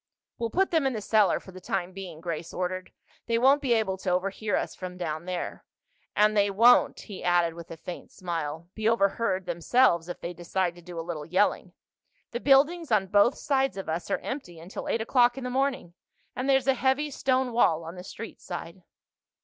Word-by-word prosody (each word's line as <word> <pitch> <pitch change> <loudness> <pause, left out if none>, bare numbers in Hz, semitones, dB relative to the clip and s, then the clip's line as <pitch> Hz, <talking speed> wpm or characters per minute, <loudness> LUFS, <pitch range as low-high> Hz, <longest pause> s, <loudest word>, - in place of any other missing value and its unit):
"We'll 230 -1 -1
put 380 - +1
them 320 -5 +3
in 265 - -1
the 220 - -3
cellar 210 -1 +3
for 190 - -13
the 185 0 -11
time 180 0 -2
being," 180 -4 -8
Grace 170 -1 -5
ordered. 185 0 -3 0.4
"They 230 0 +2
won't 270 +4 +5
be 255 -4 +2
able 200 -4 0
to 185 - -2
overhear 195 +4 0
us - - -2
from 180 -1 -7
down 160 -2 -4
there. 180 -1 -4 0.5
And 215 +1 +4
they 205 -1 +4
won't," 230 +5 +5
he 200 -4 -9
added 175 -2 +3
with 170 0 -10
a 165 - -8
faint 175 +2 -8
smile, 165 -3 -4
"be 220 0 +1
overheard 200 -3 +1
themselves 175 +1 +2
if 175 - -6
they 170 - -5
decided 175 +1 -1
to - - -12
do 175 -1 -8
a 165 - -5
little 155 -4 -5
yelling. 185 +4 +1 0.6
The 240 - -3
buildings 290 +4 +3
on 205 -3 +3
both 205 +6 +4
sides 270 -5 0
of 195 - -5
us 165 +1 -3
are - - +1
empty 180 - -6
until 170 +4 -7
eight 225 - 0
o'clock 240 +2 +3
in 265 - -5
the 250 - -3
morning—and 260 -1 -3
there's 265 -1 +4
a 270 - +4
heavy 265 +3 +1
stone 260 -1 +1
wall 170 -9 +3
on 165 +1 -7
the 180 0 -9
street 225 +4 -9
side." 175 0 -7
195 Hz, 205 wpm, -27 LUFS, 175-245 Hz, 0.6 s, won't